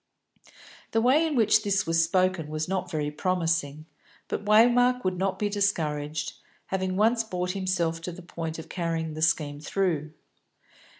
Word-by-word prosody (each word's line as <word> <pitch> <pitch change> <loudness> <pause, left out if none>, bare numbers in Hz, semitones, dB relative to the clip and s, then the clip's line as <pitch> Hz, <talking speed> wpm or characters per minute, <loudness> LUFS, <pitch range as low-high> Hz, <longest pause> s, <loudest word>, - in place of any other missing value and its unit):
The 225 - +3
way 280 +7 +4
in 305 - -2
which 220 -2 +4
this 200 -1 0
was 165 0 +3
spoken 185 -1 +1
was 155 +1 -3
not 185 -1 -2
very 150 -3 -2
promising, 160 -3 -1 0.4
but - - -3
Waymark 245 +4 +4
would 185 0 0
not 190 0 0
be 210 - 0
discouraged, 155 -7 -1 0.3
having 190 -1 -2
once 225 +3 +3
brought 180 -4 -3
himself 180 -4 -1
to 180 - -5
the 180 +1 -11
point 165 -2 -5
of 160 - -8
carrying 165 -3 -3
the 155 - -6
scheme 150 -3 +1
through. 155 -2 -1
180 Hz, 160 wpm, -27 LUFS, 160-200 Hz, 0.4 s, way